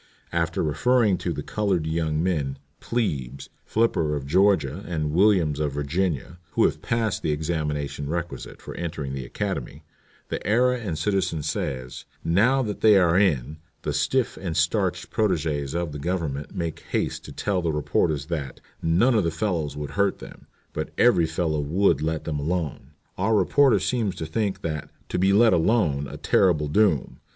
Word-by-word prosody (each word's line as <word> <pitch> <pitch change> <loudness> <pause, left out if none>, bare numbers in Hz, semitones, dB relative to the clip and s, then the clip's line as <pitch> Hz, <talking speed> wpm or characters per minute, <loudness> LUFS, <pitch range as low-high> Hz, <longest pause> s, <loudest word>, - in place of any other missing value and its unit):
After 85 -1 0
referring 105 - +2
to - - -2
the - - -4
colored 100 -6 0
young 80 -1 0
men, 75 -7 -1 0.2
'Plebes' 70 - -2 0.2
Flipper 85 -9 +1
of 70 -2 -4
Georgia, 90 0 +2
and 75 -4 -2
Williams 85 -5 +3
of 75 -2 -1
Virginia, 80 +3 -2
who - - +3
have - - 0
passed 115 -3 -1
the - - -1
examination 75 -2 -2
requisite 85 +1 -5
for - - -7
entering 80 -5 -4
the 65 -2 -4
Academy, 70 +4 -4 0.5
the - - -3
Era 125 +4 +2
and 95 -9 -4
Citizen 90 -3 0
says: 65 -4 -4 0.2
'Now 120 +11 +3
that 105 -3 -4
they 105 -2 +7
are 90 -3 +4
in, 75 -7 +2 0.3
the - - -1
stiff 130 -3 0
and 85 -5 -4
starched - - 0
protègès 80 -8 0
of 85 -2 -1
the 75 - -6
Government 75 -3 -3
make 85 -2 -3
haste - - -1
to - - -9
tell 100 -3 -1
the 85 -2 0
reporters 75 -1 0
that 75 -6 -4 0.2
"none 90 +11 +3
of 110 -4 +3
the 85 - +1
fellows 80 -4 -2
would 75 -1 -5
hurt 100 +6 +1
them, - - -12 0.3
but - - -3
every 95 -9 +4
fellow 80 -1 -1
would 80 +1 +2
let 80 0 -1
them 75 -2 -3
alone." 75 -2 -3 0.3
Our 110 +4 +2
reporter 130 +7 +4
seems 115 -7 -1
to 80 - -5
think 95 +3 -2
that 75 -3 -3 0.2
"to - - -1
be 95 +2 +4
let 110 +2 +5
alone" 80 -6 +2
a 70 +3 -8
terrible 75 -3 +2
doom. 85 -4 +2
85 Hz, 170 wpm, -25 LUFS, 75-100 Hz, 0.5 s, they